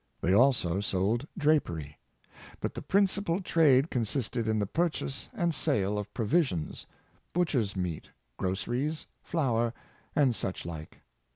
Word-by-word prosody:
They 90 - +2
also 105 -6 +4
sold 105 +6 0
drapery. 85 - +1 0.6
But - - -3
the - - -6
principal 195 -2 +2
trade 155 -6 +4
consisted 115 -1 -1
in 110 0 +2
the 105 - +1
purchase 155 - -2
and 170 -1 0
sale 105 -6 +1
of 105 - -6
provisions 115 - 0 0.2
— - - -37
butchers' 130 - +1
meat, 90 -4 -3 0.3
groceries, 125 +11 -2 0.2
flour, 120 -8 0 0.4
and 140 -5 +4
such 95 -4 -3
like. 80 -2 -8
120 Hz, 125 wpm, -30 LUFS, 95-155 Hz, 0.6 s, also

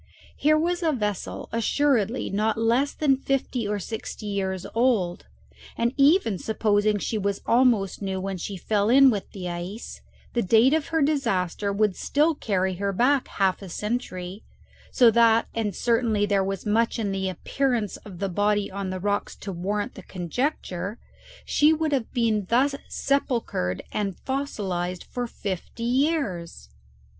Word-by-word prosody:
Here 305 +1 +3
was 345 +3 0
a 325 -2 +2
vessel 210 -7 -3
assuredly 235 -1 +1
not 215 +2 +1
less 235 +5 +2
than 275 -3 +2
fifty 260 -4 -1
or 205 0 -1
sixty 215 +2 -6
years 190 -2 -2
old, 225 -8 +1 0.5
and 235 +2 +1
even 275 - +4
supposing 210 -1 +1
she 215 +2 -2
was 200 0 -2
almost 230 -6 +3
new 190 -1 -2
when 190 0 -3
she 195 +3 -5
fell 205 +3 0
in 270 +2 +7
with 205 -4 -3
the 185 -3 -6
ice, 175 +6 -6 0.3
the 240 - +1
date 225 +7 +4
of 315 -1 +1
her 320 -2 +1
disaster 200 - 0
would 205 -1 +1
still 305 +3 +2
carry 190 - -1
her 200 +1 -1
back 250 +7 +2
half 195 -1 0
a 195 - -8
century; 200 -2 -4 0.5
so 240 -2 +6
that 230 0 +4
and 210 -4 -2
certainly 230 -3 +1
there 200 -1 +2
was 195 -1 -3
much 225 +2 +1
in 210 -3 -1
the 190 -1 -1
appearance 235 +3 -1
of 195 -4 -12
the 195 - -1
body 205 +2 +1
on 195 0 -4
the 185 0 -4
rocks 205 +2 -1
to 200 - -7
warrant 205 +4 -2
the - - -10
conjecture 190 - -3 0.5
she 300 +2 +4
would 315 -1 -1
have 260 -5 -1
been 220 -5 +1
thus 265 +4 +3 0.2
sepulchred 235 - -1
and 200 -3 -2
fossilized 190 -10 -3
for 245 -1 -4
fifty 200 +2 -5
years! 235 - -1
215 Hz, 155 wpm, -25 LUFS, 195-250 Hz, 0.5 s, in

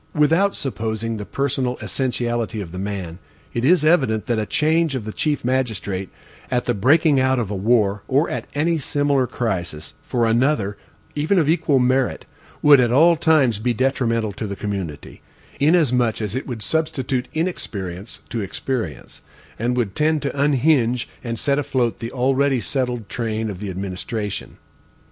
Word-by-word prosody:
Without 165 +7 +3
supposing 115 -3 -3
the 105 - -7
personal 135 -2 -1
essentiality 120 -3 -2
of 90 -5 -6
the 90 - -6
man, 95 -4 -4 0.3
it 120 - -2
is 160 +2 +4
evident 130 -10 +3
that 120 -3 0
a 105 - -2
change 160 0 +2
of 120 -5 -4
the 110 - -5
chief 150 -5 -1
magistrate, 110 -7 -1 0.4
at 125 -1 0
the 120 - +1
breaking 140 - +4
out 130 0 +2
of 110 -5 -2
a - - -2
war, 105 0 +2
or 140 +5 +2
at - - -4
any 160 +3 +1
similar 140 -2 +1
crisis, 90 -11 -3
for 120 -2 0
another, 115 -3 +1 0.4
even 155 +7 +1
of 160 -5 +3
equal 155 -3 +2
merit, 130 +1 +1 0.4
would 145 -2 +8
at 120 -2 +3
all 165 +7 +6
times 150 -9 +3
be 120 +2 0
detrimental 115 -4 0
to 105 +2 -5
the 100 - -4
community, 95 -8 -5 0.4
inasmuch 135 -7 +3
as 105 -2 -3
it 130 - -3
would 115 -5 -5
substitute 135 -1 -1
inexperience 100 - -4
to 115 - -2
experience, 105 - -4 0.4
and 120 +2 0
would 110 -6 -1
tend 155 0 +1
to 140 - -2
unhinge 135 -4 +2 0.2
and 115 -1 -3
set 140 +4 +1
afloat 130 -5 0
the 115 0 -5
already 135 +1 +2
settled 125 -3 -2
train 110 0 -2
of 90 - -8
the 105 -1 -5
administration. 100 +3 -4
125 Hz, 160 wpm, -21 LUFS, 110-140 Hz, 0.4 s, would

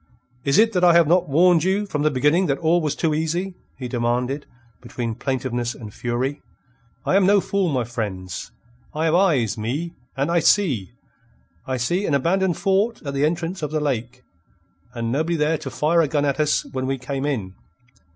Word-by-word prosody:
"Is 140 +4 +2
it 225 +1 +5
that 180 -1 +1
I 175 -1 +7
have 170 -2 +5
not 175 0 +3
warned 170 +2 +4
you 195 +3 +1
from 150 -7 -3
the 155 - +3
beginning 150 +7 +2
that 140 -2 +1
all 170 +2 +2
was 150 -3 -1
too 160 -2 0
easy?" 170 +5 -1 0.2
he 130 - -5
demanded 125 +3 -1 0.3
between 120 -1 -4
plaintiveness 125 -1 -2
and 105 -3 -10
fury. 125 +4 -2 0.6
"I - - +2
am 195 -1 +4
no 205 +1 +5
fool, 195 -1 0
my 130 -4 0
friends. 100 -7 -5 0.4
I 155 +1 0
have 160 - +2
eyes, 150 - +2
me. 145 +11 -3 0.2
And 140 +5 0
I 170 - +3
see. 140 - +2 0.8
I 130 0 -1
see 175 - 0
an 145 - +2
abandoned 175 +5 +1
fort 200 +4 +1
at 140 - -3
the 140 +1 +2
entrance 170 +3 -2
of 150 - -2
the 155 - -1
lake, 125 -3 -3 0.7
and 115 -1 -2
nobody 160 +6 0
there 155 0 +1
to 135 - -6
fire 160 +5 +2
a 160 - +1
gun 145 0 0
at 140 +1 -1
us 150 -1 +1
when 130 0 -4
we 135 0 -1
came 135 +2 -4
in. 115 -11 -2
150 Hz, 195 wpm, -22 LUFS, 125-170 Hz, 0.8 s, I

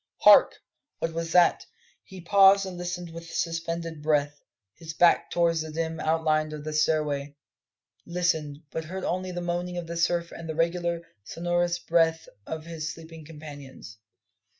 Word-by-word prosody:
Hark! - - +7 0.4
what 165 - -3
was 165 0 -3
that? 175 -1 +5 0.4
He 190 -1 -11
paused 195 +2 +6
and 185 -1 -6
listened 175 -1 -5
with 165 0 -9
suspended 165 -1 -3
breath, 145 -1 0 0.3
his 160 +3 -9
back 175 0 +4
towards 170 -2 +1
the 160 - -6
dim 165 +1 -3
outline 155 -1 +1
of 150 -1 -7
the 155 0 -5
stairway; 150 -2 0 0.7
listened, 160 -4 -1
but 160 0 -4
heard 185 +4 -6
only 185 +1 -2
the 175 0 -4
moaning 175 +1 -3
of 175 - -4
the 170 +1 -6
surf 170 0 0
and 165 -1 -8
the 160 - -3
regular, 170 +1 0 0.2
sonorous 175 - -1
breathing 165 -1 +2 0.3
of 160 0 -5
his 160 -2 -5
sleeping 160 -1 -11
companions. 145 -7 -11
165 Hz, 155 wpm, -27 LUFS, 155-175 Hz, 0.7 s, Hark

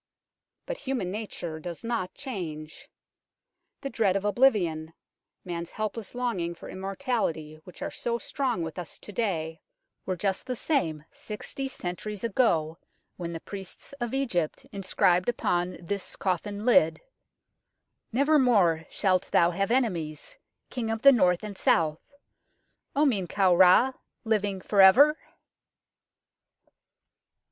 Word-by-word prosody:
But - - -4
human 255 - -2
nature 180 -6 -5
does 170 +3 -7
not 230 -6 -2
change. 160 - -7 0.9
The 275 - -4
dread 200 -5 +2
of 195 +1 -1
oblivion, 185 -9 +2 0.5
man's 170 -1 -5
helpless 215 +1 -4
longing 190 -9 -2
for - - -11
immortality, 190 - -3
which 180 - -9
are - - -3
so 235 0 -2
strong 245 -6 -1
with 160 +2 -5
us 175 - -7
to - - -10
day, 170 -7 -2 0.5
were 185 - 0
just 190 +1 -2
the 255 - -2
same 165 - 0
sixty 225 +5 -5
centuries 210 -3 -5
ago 175 -9 +1 0.4
when 170 -2 -4
the 165 -1 -6
priests 195 +5 -7
of 240 -1 -2
Egypt 235 - -1
inscribed 185 -1 +2
upon 180 -6 0
this 200 +3 -4
coffin 200 +3 -2
lid 165 -10 +4 0.6
" - - -55 0.3
Never 285 +6 +4
more 185 -11 +3
shall 185 -2 +2
thou 170 -1 +2
have 195 +4 -1
enemies, 195 - -1 0.4
King 235 -3 -3
of 225 0 -3
the 275 - +10
North 185 -6 +3
and 210 -2 -6
South, 155 -4 +2 0.9
O 295 +2 +4
Men 205 -10 +1
kau 190 0 +3
Ra, 185 +8 +6 0.3
living 205 -4 0
for 200 +1 +3
ever 285 +11 +7
195 Hz, 130 wpm, -27 LUFS, 170-235 Hz, 0.9 s, the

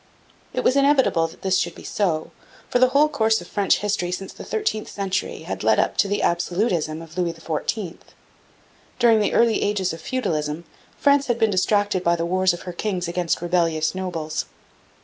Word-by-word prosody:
It - - -2
was 255 - +3
inevitable 275 - +3
that 165 - -16
this 190 -1 +2
should 170 -2 -2
be - - -12
so, 165 -6 -1 0.4
for 245 - +3
the 255 - +6
whole 280 +4 +4
course 225 -7 +2
of 175 - -10
French 200 -1 +2
history 205 -4 -1
since 190 +1 -5
the - - -10
thirteenth 420 - -2
century 195 -1 -3
had - - -5
led - - +4
up - - +1
to 200 - +3
the 205 +1 -1
absolutism 170 -2 0
of 165 0 -13
Louis 170 -2 0
XIV. 165 +3 -3 1.0
During 235 -3 +5
the 210 - 0
early 230 -2 +3
ages 195 -4 0
of 165 - -8
feudalism 155 - -2 0.3
France 280 0 +3
had 240 -2 +1
been 225 -2 +2
distracted 200 0 +1
by 170 0 +3
the 170 0 -2
wars 185 +2 +2
of 175 - -6
her 180 - -6
kings 185 -1 -2
against 175 -1 -1
rebellious 165 -3 +1
nobles. 165 -4 -3
185 Hz, 190 wpm, -23 LUFS, 170-220 Hz, 1.0 s, the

